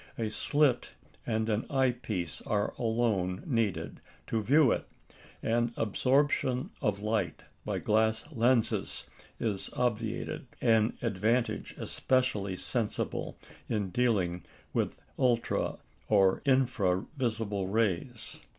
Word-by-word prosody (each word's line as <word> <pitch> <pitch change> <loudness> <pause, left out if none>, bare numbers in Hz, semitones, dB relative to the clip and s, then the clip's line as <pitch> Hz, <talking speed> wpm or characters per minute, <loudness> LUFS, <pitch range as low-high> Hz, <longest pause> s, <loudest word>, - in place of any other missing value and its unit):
A 110 -2 -1
slit 145 +3 +2 0.3
and 110 -1 0
an 110 0 0
eye 130 -2 +3
piece 105 -9 -4
are 105 -2 0
alone 110 -6 0
needed 115 - -1 0.2
to 115 - -1
view 135 +3 +5
it, - - -1 0.6
and 120 +1 +1
absorption 130 - +1
of 100 -1 0
light 105 -7 -1 0.2
by - - -1
glass 110 +1 +2
lenses 120 -3 +1 0.3
is 105 -4 -1
obviated 115 +1 -2
an 115 -1 +3
advantage 115 +3 0
especially 105 -7 0
sensible 115 0 -2 0.3
in 100 -4 -1
dealing 95 -7 +1 0.3
with - - 0
the - - -29 0.2
ultra 120 -3 +1 0.3
or 95 -3 +4
infra 120 -9 +2
visible 110 -7 -1
rays. 110 +3 -1
115 Hz, 110 wpm, -30 LUFS, 105-125 Hz, 0.6 s, view